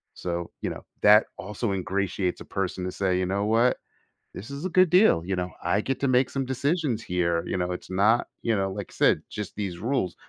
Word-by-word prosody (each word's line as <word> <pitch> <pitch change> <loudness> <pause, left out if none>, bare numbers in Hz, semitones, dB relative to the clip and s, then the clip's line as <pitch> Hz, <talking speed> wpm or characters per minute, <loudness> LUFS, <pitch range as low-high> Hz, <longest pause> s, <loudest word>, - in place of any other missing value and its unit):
So, 85 -1 -4
you - - -1
know, - - -8 0.2
that 105 +1 +7
also 105 +3 -3
ingratiates 95 -1 -2
a - - -8
person 95 -1 -3
to 90 - -3
say, 90 -1 0
you 95 - 0
know 100 +2 0
what? 115 +3 +3 0.6
This 100 - -9
is 140 +4 -6
a - - 0
good 185 -1 +4
deal, 180 - +5
you 95 +2 -2
know? 90 0 -2
I 90 +4 +1
get 135 +4 -2
to 140 - +1
make 130 0 +3
some 135 -1 -2
decisions 135 -2 -1
here, 85 -3 0
you - - -1
know? 90 0 -1
It's 90 - -7
not, 105 +5 +3
you 115 - +1
know, 95 -1 0
like 100 0 -7
said, - - +3
just 105 -3 -6
these 95 -5 -4
rules 115 -7 -1
100 Hz, 220 wpm, -26 LUFS, 90-125 Hz, 0.6 s, that